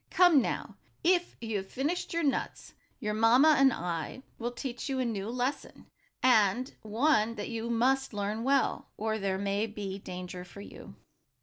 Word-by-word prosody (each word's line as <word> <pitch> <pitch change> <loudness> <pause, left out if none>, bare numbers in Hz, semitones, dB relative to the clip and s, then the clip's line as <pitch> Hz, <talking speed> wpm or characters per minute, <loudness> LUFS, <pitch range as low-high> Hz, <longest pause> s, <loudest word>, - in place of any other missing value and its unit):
Come 355 -6 +6
now, - - -4 0.3
if 350 0 +2
you 225 -2 -2
have 190 0 -6
finished 300 +7 -2
your 335 -1 0
nuts, 280 - -2 0.3
your 210 0 -2
mamma 240 +8 +6
and 270 -1 +6
I 175 +6 -4 0.2
will 240 +1 -2
teach 245 +1 -5
you 270 - -1
a 255 - 0
new 210 -3 -3
lesson, 250 +3 -3 0.4
and 245 0 +3
one 225 0 +2
that 205 - -5
you 230 0 -4
must 265 +3 +2
learn 210 +1 -3
well, 275 +1 +1
or 220 0 -1
there 195 -1 -1
may 200 +2 -1
be 200 -2 -6
danger 180 -1 -7
for 200 +2 -12
you." - - -11
230 Hz, 170 wpm, -30 LUFS, 205-265 Hz, 0.4 s, Come